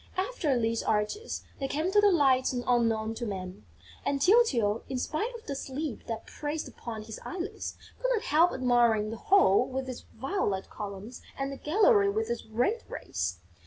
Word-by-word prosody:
After 370 - 0
these 225 0 0
arches, 215 - -1 0.2
they 270 - -1
came 310 +7 -1
to 415 +1 +5
the 415 - +6
Lights 270 -6 +3
Unknown 230 -3 +1
to 235 +1 -4
Man; 185 - -6 0.4
and 280 - 0
Tyltyl, 275 - +4
in 265 - -2
spite 315 - -1
of 460 - -10
the 280 - -3
sleep 275 -1 -5
that 225 -1 -4
pressed 300 +1 -4
upon 225 -3 -7
his 220 0 -8
eyelids, 365 -1 -5 0.2
could - - +1
not 455 -4 +1
help 325 +4 +4
admiring 235 -4 +3
the 225 - -5
hall 250 - +4
with 265 0 -3
its 255 -2 -7
violet 230 - -2
columns 205 +3 -7 0.2
and 275 0 -2
the 275 - -6
gallery 405 - +4
with 440 +3 -1
its 475 - -4
red 245 - 0
rays. 85 0 -3
260 Hz, 175 wpm, -29 LUFS, 225-360 Hz, 0.4 s, the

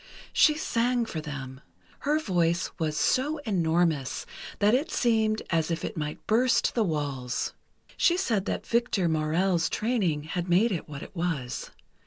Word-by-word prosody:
She 300 - +5
sang 245 -4 +1
for 165 -8 -5
them. 135 -3 -7 0.4
Her 295 +2 +1
voice 175 - +1
was 155 -2 -1
so 290 - +2
enormous 165 - +1 0.3
that 205 +2 +3
it 285 +7 +2
seemed 220 -5 +1
as 165 -1 +1
if 165 -1 -2
it - - -5
might 150 -1 -5
burst 235 +3 +3
the 230 - +2
walls. 140 -8 -2 0.4
She 345 - +4
said 225 - 0
that - - -3
Victor 235 -6 +1
Maurel's 165 +2 +1
training 200 -11 0
had 175 +3 -4
made 200 +7 +4
it 170 -4 -3
what 145 -1 -7
it - - -12
was. 165 -8 -3
175 Hz, 155 wpm, -27 LUFS, 155-230 Hz, 0.4 s, She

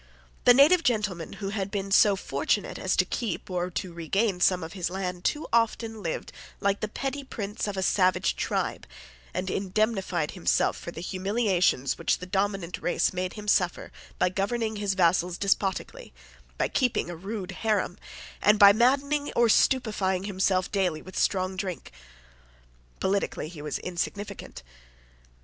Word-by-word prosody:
The 245 - +9
native 310 +7 +6
gentleman 205 - -1
who 195 -2 -5
had 200 -2 -3
been 195 -1 -4
so 200 0 +6
fortunate 190 - -1
as - - 0
to - - +3
keep 225 -4 -4
or 180 0 -1
to 180 0 -5
regain 185 +4 0
some 180 -1 +3
of 160 - -7
his 180 -3 -2
land 180 -1 -4
too 300 +1 0
often 225 -1 +1
lived 165 -4 -4 0.3
like 200 0 +1
the 215 - -2
petty 275 +5 -4
prince 210 -4 -4
of 200 -1 -4
a 190 - 0
savage 185 0 +2
tribe, - - -2 0.4
and 185 +1 -3
indemnified 190 -4 -1
himself 180 - +1
for - - -8
the 165 - -7
humiliations 185 - 0
which - - +1
the 180 - -8
dominant 195 -2 -2
race 175 - +1
made 185 0 -3
him 210 -1 -9
suffer 180 -3 +1 0.3
by - - +2
governing 215 +4 -1
his 205 -2 -1
vassals 175 -1 +2
despotically, 200 - -1 0.4
by - - +1
keeping 245 - 0
a - - -6
rude 195 +2 -5
haram, 205 -2 -1 0.4
and 210 +1 +5
by 200 -1 +9
maddening 280 +5 +2
or 235 -1 +4
stupefying 210 -7 +2
himself 190 -2 0
daily 180 -6 0
with 185 - -11
strong 185 -1 0
drink. 185 -2 -5 1.1
Politically 190 -5 -1
he 160 -3 -10
was 150 -1 -3
insignificant. 180 - -5
195 Hz, 155 wpm, -27 LUFS, 180-215 Hz, 1.1 s, The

